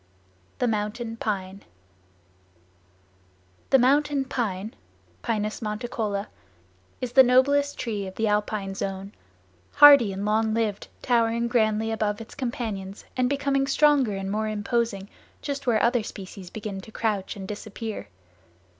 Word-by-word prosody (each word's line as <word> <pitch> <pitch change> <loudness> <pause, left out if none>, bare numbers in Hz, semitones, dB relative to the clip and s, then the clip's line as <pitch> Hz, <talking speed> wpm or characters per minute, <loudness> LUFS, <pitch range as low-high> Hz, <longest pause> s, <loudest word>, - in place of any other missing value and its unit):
The 250 - +1
Mountain 225 +1 -2
Pine 195 -3 -3 2.1
The 270 - +6
Mountain 280 +2 +2
Pine 215 -4 -3 0.5
(Pinus 215 -2 -2
monticola) 215 -2 -3 0.7
is 250 -2 -4
the 265 +2 +8
noblest 280 +3 +3
tree 210 -5 -3
of 190 - -9
the 220 - 0
alpine 210 -1 -1
zone—hardy 190 - +3
and 195 +1 -4
long 220 +1 +1
lived 215 -3 -1 0.2
towering 235 -1 +2
grandly 220 -2 +1
above 210 -2 -1
its 225 - -10
companions 220 -7 -5
and 250 -1 +1
becoming 275 -1 0
stronger 280 -6 +3
and 195 0 -4
more 215 +1 -1
imposing 215 -1 -1 0.4
just 280 -2 -4
where 225 -3 +3
other 240 0 +3
species 195 -3 -9
begin 205 -2 -6
to 220 - -13
crouch 210 -4 -2
and 195 -2 -7
disappear. 215 +1 -6
220 Hz, 125 wpm, -25 LUFS, 200-245 Hz, 2.1 s, the